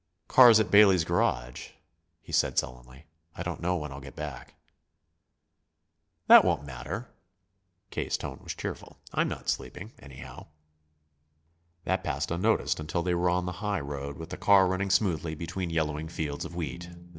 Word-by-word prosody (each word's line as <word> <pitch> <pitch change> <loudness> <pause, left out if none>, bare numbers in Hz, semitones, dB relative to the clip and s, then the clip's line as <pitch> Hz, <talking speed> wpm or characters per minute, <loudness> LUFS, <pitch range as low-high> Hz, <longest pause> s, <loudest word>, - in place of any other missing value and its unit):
"Car's 120 -4 +8
at 110 - 0
Bailey's 100 -4 +6
garage," 60 -5 -1 0.5
he - - -13
said - - +1
sullenly. 65 +4 -4 0.3
"I 90 - -5
don't 85 -2 -5
know 90 +1 0
when 75 -4 -5
I'll 70 - -8
get 65 -1 -11
back." 75 -4 -8 1.7
"That - - +9
won't 70 - 0
matter." 65 -2 -6 0.8
K.'s - - -2
tone - - -7
was - - -6
cheerful. - - -7 0.2
"I'm - - +1
not - - -6
sleeping, 105 +5 -4
anyhow." 65 -2 -11 1.4
That 95 - -1
passed 70 +1 -3
unnoticed 95 +3 +1
until 80 +2 -2
they 90 0 0
were 90 +1 +1
on 90 0 0
the 90 - -3
highroad, 70 -9 -4
with 80 - -9
the - - -5
car 100 -2 +5
running 95 +2 -1
smoothly 85 -5 +1
between 85 +3 -4
yellowing 80 -1 -2
fields 75 -3 -4
of 85 - -9
wheat. 85 +1 -5
85 Hz, 155 wpm, -28 LUFS, 70-90 Hz, 1.7 s, That